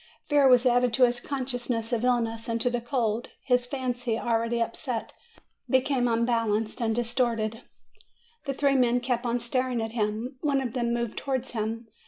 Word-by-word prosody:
Fear 290 -2 +5
was 250 -1 +6
added 245 -1 +3
to 255 - +4
his 240 0 -1
consciousness 245 -3 -3
of 235 0 0
illness 235 -2 0
and 230 0 0
to 245 - +1
the 240 -1 -1
cold; 235 -2 -1
his 250 -2 +2
fancy, 245 -3 -2
already 230 0 0
upset, 235 0 -3 0.6
be 260 - +5
came 255 -2 0
unbalanced, 230 -2 +1 0.2
distorted. 235 -2 0 0.8
The 275 -2 -2
three 280 0 +2
men 245 -2 +3
kept 245 -1 -1
on 240 +1 0
staring 250 +1 0
at 225 0 -3
him; 225 +3 -2
one 285 -2 +2
of 250 -4 -3
them 240 -2 0
moved 235 -2 -2
towards 260 -2 -2
him. 225 0 -3
240 Hz, 170 wpm, -27 LUFS, 230-255 Hz, 0.8 s, was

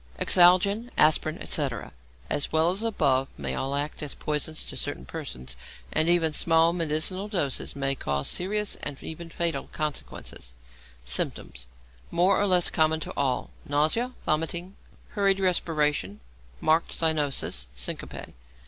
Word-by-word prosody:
=Exalgin, 190 +6 +5
Aspirin, 155 +1 +4
etc.=, 130 - -1 0.4
as 145 - 0
well 160 +2 +3
as 190 - -2
the 230 - -1
above, 135 -11 +2
may 70 -2 -3
all 135 - -2
act 145 +1 -3
as 150 -2 -4
poisons 150 +1 -2
to - - -6
certain - - -3
persons, 65 0 -6 0.4
and 160 +2 +2
even 165 -3 +3
small 165 +1 +4
medicinal 170 +4 0
doses 170 - -1
may 135 0 +1
cause 70 - -2
serious 210 +3 0
and 145 -1 -5
even 165 +1 -7
fatal 165 -4 -1
consequences. 130 - -5 0.5
Symptoms - - -1 0.4
(more 180 +4 +3
or 205 - +2
less 180 -2 +4
common 160 -1 +2
to - - -5
all). 130 -3 -1
Nausea, 155 - +1
vomiting, 170 +5 -1 0.3
hurried 195 -2 +2
respiration, 150 - 0 0.4
marked 160 +1 +2
cyanosis, 145 - 0
syncope. 60 0 -5
155 Hz, 135 wpm, -27 LUFS, 140-175 Hz, 0.5 s, =Exalgin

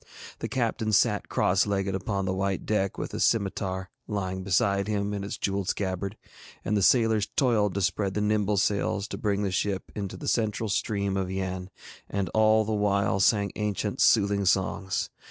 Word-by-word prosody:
The - - -3
captain 115 -3 -1
sate 105 0 +2
cross 95 +3 +2
legged 100 -1 -1
upon 95 +1 -2
the 95 - -1
white 95 0 -1
deck 100 -3 0
with - - -4
his - - -1
scimitar 95 -3 0 0.2
lying 95 -3 -3
beside 100 +1 +1
him 105 -1 -1
in 100 -1 -3
its 100 - -5
jewelled 100 -1 -1
scabbard, 95 +1 -2 0.5
and 105 - 0
the 100 - +2
sailors 110 -1 +3
toiled 110 -7 +2
to 100 - 0
spread 95 +2 0
the 105 - 0
nimble 105 -1 +1
sails 100 +1 0
to - - -5
bring 105 -2 0
the 100 - -1
ship 95 +1 -2
into 100 -2 -5
the - - -7
central 110 -1 0
stream 100 -1 -1
of 95 -1 -1
Yann, 95 -1 -3 0.4
and 100 -1 -2
all 110 0 +4
the 110 - -1
while 100 -2 +1
sang 100 +1 +3
ancient 105 -1 -2
soothing 100 -2 +4
songs. 95 0 0
100 Hz, 180 wpm, -27 LUFS, 95-105 Hz, 0.5 s, all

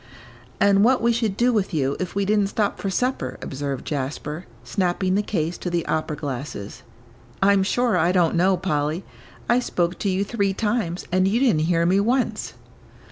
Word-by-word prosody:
"And 200 0 +4
what 250 +3 +4
we 235 +1 +2
should 225 -4 -1
do 245 +1 +3
with 200 -5 0
you 140 -2 0
if 185 0 -4
we 200 0 +1
didn't 205 0 +2
stop 205 +1 -1
for 195 - -2
supper," 190 - -1
observed 140 -1 -4
Jasper, 150 +3 -4 0.2
snapping 185 +7 0
the 200 - +2
case 175 -5 -2
to 180 - -3
the 170 -1 -1
opera 155 -1 -1
glasses, 135 -7 -6 0.6
"I'm 200 0 +5
sure 235 +3 +1
I 175 0 +3
don't 175 -3 +3
know, 185 +2 +3
Polly. 155 -1 -1 0.4
I 240 +1 +4
spoke 175 -7 -1
to 200 - 0
you 190 +1 +1
three 200 -3 -1
times, 210 -6 -1
and 185 +1 +3
you 215 +5 +2
didn't 215 - +3
hear 170 -1 +2
me 185 +3 +3
once." 245 +5 0
185 Hz, 185 wpm, -23 LUFS, 160-210 Hz, 0.6 s, I'm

